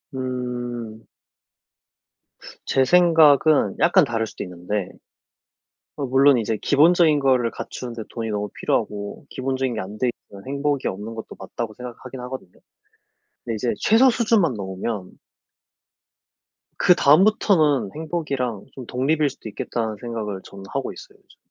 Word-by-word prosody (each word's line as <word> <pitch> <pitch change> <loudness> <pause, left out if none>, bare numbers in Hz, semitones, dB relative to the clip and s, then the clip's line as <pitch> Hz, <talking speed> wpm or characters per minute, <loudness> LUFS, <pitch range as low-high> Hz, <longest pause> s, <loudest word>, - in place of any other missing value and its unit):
음. 120 -3 -5 1.6
제 135 - +3
생각은 155 - +5
약간 180 0 +5
다를 115 -4 -1
수도 - - -7
있는데 90 +2 -4 1.1
어 140 - -2
물론 135 +1 +5
이제 110 -1 -1
기본적인 155 +1 +4
거를 130 -4 +2
갖추는 125 -2 -7
데 115 -2 -6
돈이 115 -2 -4
너무 105 -1 -2
필요하고 100 0 -2
기본적인 130 -1 -2
게 - - -2
안 100 +3 -8
돼 125 - +2 0.2
있으면 100 +2 -13
행복이 140 0 -1
없는 105 +4 -5
것도 110 - -8
맞다고 110 +3 -6
생각하긴 125 +1 -9
하거든요. 125 -7 -7 0.9
근데 115 -2 -3
이제 120 +2 -1
'최소 240 +5 +5
수준만 225 - +2
넘으면' 95 -1 -5 1.7
'그다음부터는 175 - +4
행복이랑 140 - -3
좀 130 -3 -9
독립일 145 +5 +1
수도 110 - -10
있겠다.'는 110 0 -3
생각을 110 -5 -5
저는 100 0 -11
하고 135 -1 -3
있어요, - - -13
요즘. - - -25
125 Hz, 305 characters per minute, -22 LUFS, 110-145 Hz, 1.7 s, 생각은